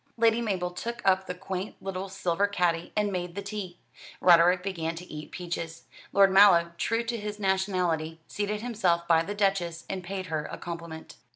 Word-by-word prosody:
Lady 230 0 +3
Mabel 185 -6 -1
took 235 +7 -5
up 190 0 +3
the 180 - -4
quaint 190 +1 -5
little 195 0 -5
silver 195 0 0
caddy 175 -4 0
and 210 -1 +1
made 180 -2 -4
the 200 - -4
tea. 200 -4 -6 0.4
Roderick 180 +1 +6
began 165 -4 -3
to 175 +2 -8
eat 150 -3 -8
peaches. 165 -2 -5 0.3
Lord 195 -1 +5
Mallow, 190 -4 +6
true 230 +1 +1
to 235 0 -3
his 210 -1 -5
nationality, 185 -5 0
seated 210 +1 -2
himself 180 -8 +1
by 165 -1 +5
the 205 +5 -4
Duchess, 190 -5 0
and 190 -1 -4
paid 190 +1 -4
her 155 -3 -3
a - - -5
compliment. 170 -2 -8
185 Hz, 180 wpm, -28 LUFS, 170-200 Hz, 0.4 s, Roderick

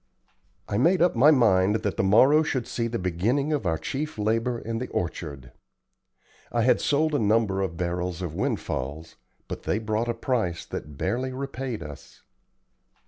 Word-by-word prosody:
I 100 - -1
made 175 +8 +4
up 175 -3 +3
my 130 +6 +6
mind 105 -8 +4
that 100 -3 -1
the - - +1
morrow 125 +10 +5
should 130 -6 -1
see 115 0 -2
the 115 0 -2
beginning 110 - 0
of 135 -11 -1
our 80 -1 +1
chief 140 - -4
labor 115 +3 0
in 115 0 -4
the 125 - -4
orchard. 70 -6 -4 1.0
I 120 -1 +1
had 125 - +3
sold 155 +2 +1
a 145 - +2
number 105 -2 +2
of 90 -4 -3
barrels 90 0 -2
of 85 -4 -4
windfalls, 75 +2 -3 0.3
but - - -6
they - - 0
brought 110 +2 -1
a 120 - -1
price 115 -8 -1
that 75 -1 -7
barely 130 - -1
repaid 130 -2 -4
us. 75 -1 -12
110 Hz, 170 wpm, -26 LUFS, 90-130 Hz, 1.0 s, my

